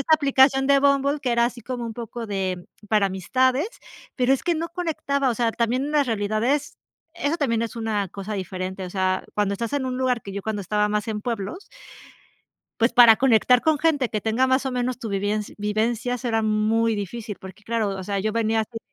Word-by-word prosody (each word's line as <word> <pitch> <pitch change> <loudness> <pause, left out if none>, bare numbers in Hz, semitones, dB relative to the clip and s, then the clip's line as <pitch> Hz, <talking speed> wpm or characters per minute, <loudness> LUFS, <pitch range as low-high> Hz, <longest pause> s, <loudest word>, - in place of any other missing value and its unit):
esta 315 +3 +4
aplicación 270 -2 +4
de 280 -1 +5
Bumble 280 +1 +2
que 250 -3 0
era 235 0 +3
así 240 0 -6
como 245 -1 -4
un 225 - -6
poco 235 0 -6
de 190 -3 -3 0.2
para 210 -2 +3
amistades, 255 - +1 0.5
pero, 255 0 +3
es 270 - 0
que 345 -1 +1
no 330 +1 -3
conectaba. 300 -6 -1
O - - -1
sea, 230 0 0
también 245 +4 0
una 295 -1 +2
realidad 215 -3 -1
es, 290 +3 0 0.4
eso 320 0 -1
también 230 -7 0
es 230 0 -5
una 215 -4 -1
cosa 200 +3 -6
diferente. 185 0 -4
O 180 - -7
sea, 185 -1 0
cuando 205 -1 +1
estás 230 +5 -4
en 265 -2 -1
un 255 0 -3
lugar, 255 -2 0
que 195 - -8
yo 200 0 -5
cuando 215 -2 -3
estaba 210 +2 0
más 210 0 -1
en 210 -1 -2
pueblos 235 - -4 1.2
pues, 230 - +3
para 235 -3 +8
conectar 250 -1 +4
con 315 -1 +2
gente 295 -6 +2
que 215 - -3
tenga 225 +4 +2
más 260 +1 +2
o 265 - -2
menos 250 0 -1
tu 225 -4 -6
vivienc 205 +2 -1
vivencias 230 +4 -1
erá 225 -2 +1
muy 220 +1 +1
difícil 210 +1 -5
porque, 190 +2 -12
claro, 220 -2 -1
o 190 -1 -5
sea, 200 +1 -2
yo 215 +2 -1
venía 225 0 +1
así, 225 +1 -5
230 Hz, 210 wpm, -24 LUFS, 210-260 Hz, 1.2 s, para